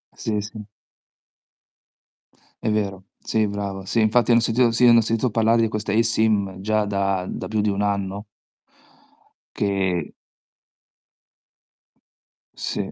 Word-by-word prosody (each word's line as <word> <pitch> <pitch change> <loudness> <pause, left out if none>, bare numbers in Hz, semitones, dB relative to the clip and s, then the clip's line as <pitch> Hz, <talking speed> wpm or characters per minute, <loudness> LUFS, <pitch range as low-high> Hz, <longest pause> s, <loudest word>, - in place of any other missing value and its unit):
Sì, 105 -2 -2
sì. 110 +2 -8 2.0
È - - 0
vero. 100 -3 -2
Sì, 110 -1 0
brava. 100 -1 -5
Sì, 115 +4 +1
infatti 115 +3 +3
ne - - +6
ho - - -1
sentito 115 +1 +2
sì, 120 +2 0
ne 115 - +7
ho - - +6
sentito 115 +3 0
parlare 115 +1 +2
di 115 - +1
questa 105 -1 -3
eSIM 110 -4 +1
già 110 +2 0
da 100 -2 -1
da - - -5
più 110 -1 -1
di 105 - +1
1 100 0 -1
anno 100 0 -2 1.3
che 95 -5 -1 2.4
Sì. - - -4
105 Hz, 130 wpm, -22 LUFS, 100-110 Hz, 2.4 s, ne